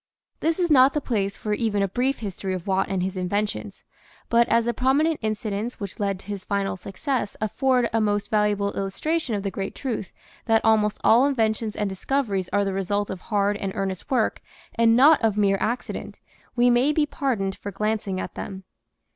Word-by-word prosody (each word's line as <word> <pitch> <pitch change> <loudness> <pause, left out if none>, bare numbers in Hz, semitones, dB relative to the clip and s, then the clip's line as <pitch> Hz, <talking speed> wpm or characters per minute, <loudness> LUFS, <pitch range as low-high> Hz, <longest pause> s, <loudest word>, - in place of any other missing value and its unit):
This 325 0 +1
is 350 -3 +1
not 270 0 +6
the - - +3
place 200 -7 -2
for 210 - -2
even 210 -2 0
a - - +1
brief 255 +7 0
history 195 -2 -3
of 180 - -6
Watt 190 0 0
and 190 -2 -1
his 190 +1 -3
inventions, 185 - -3 0.5
but 235 +1 +4
as 230 0 +3
the 240 - 0
prominent 285 +7 +2
incidents 215 +1 -3
which 200 -3 -6
led 200 -2 0
to 190 - -16
his 200 -1 -5
final 200 -1 -1
success 205 - -3
afford 250 +3 +1
a 225 - +2
most 205 -1 0
valuable 210 -1 +1
illustration 240 +7 -2
of 200 - -3
the 195 - -2
great 195 0 -4
truth 235 -7 -4 0.3
that 225 -1 +2
almost 215 -1 +3
all 245 +5 +6
inventions 220 -4 0
and 210 - -1
discoveries 195 -1 -1
are 205 0 +2
the 195 - -1
result 200 +2 -1
of 190 -1 -6
hard 205 -1 0
and 195 -2 -4
earnest 190 -2 -3
work 245 -5 +1 0.3
and 230 0 +4
not 290 +5 +6
of 215 -2 +2
mere 195 -2 +3
accident, 240 +3 -3 0.4
we 245 0 +4
may 250 +5 +3
be 300 0 +2
pardoned 240 -11 -2
for 200 - -7
glancing 205 -1 -2
at - - -5
them. 190 -1 -7
210 Hz, 195 wpm, -24 LUFS, 195-245 Hz, 0.5 s, not